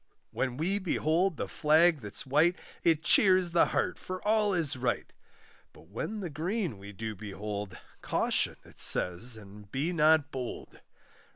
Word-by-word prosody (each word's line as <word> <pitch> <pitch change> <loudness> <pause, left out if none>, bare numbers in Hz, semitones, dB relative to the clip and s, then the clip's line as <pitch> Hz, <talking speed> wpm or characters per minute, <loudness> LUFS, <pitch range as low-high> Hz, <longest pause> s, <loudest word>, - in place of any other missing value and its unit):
When 125 -2 -2
we 185 +7 0
behold 175 -1 0
the - - -3
flag 160 0 +3
that's 105 -2 -4
white, 155 +6 +3 0.3
It 165 -2 +2
cheers 185 +2 +4
the 170 - +4
heart, 185 - -1
for 185 0 -6
all 215 -1 +3
is 155 -4 0
right; 125 -1 -2 0.6
But - - -18
when 205 - -5
the 180 - -4
green 170 - -3
we 100 +1 -10
do 110 +2 -6
behold, 105 -1 -6 0.2
Caution, - - 0
it - - -14
says, 110 +7 +4
and 100 -1 -14
be 150 +7 -1
not 155 -2 +3
bold. 125 -2 -7
155 Hz, 155 wpm, -29 LUFS, 110-175 Hz, 0.6 s, cheers